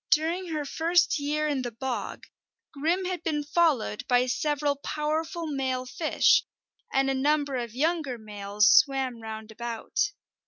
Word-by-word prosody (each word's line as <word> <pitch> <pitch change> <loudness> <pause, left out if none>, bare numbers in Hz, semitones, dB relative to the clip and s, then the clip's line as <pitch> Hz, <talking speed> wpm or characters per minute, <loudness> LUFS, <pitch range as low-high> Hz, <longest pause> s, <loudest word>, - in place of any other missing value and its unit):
During 335 +4 +1
her 305 -3 -3
first 335 +2 +2
year 300 +1 0
in 285 -3 0
the 245 - -3
bog, 250 +2 -4 0.5
Grim 330 +6 0
had 360 -2 -3
been 300 -3 -1
followed 290 -8 +1
by 250 0 +4
several 290 +2 0
powerful 315 +4 -2
male 260 -4 -2
fish, 310 +5 +3 0.5
and 270 0 +2
a 270 - +1
number 285 +1 +1
of 235 -2 -5
younger 305 -3 0
males 210 -1 0
swam 265 -4 +3
round 220 0 -7
about. 235 - -2
285 Hz, 145 wpm, -27 LUFS, 245-315 Hz, 0.5 s, by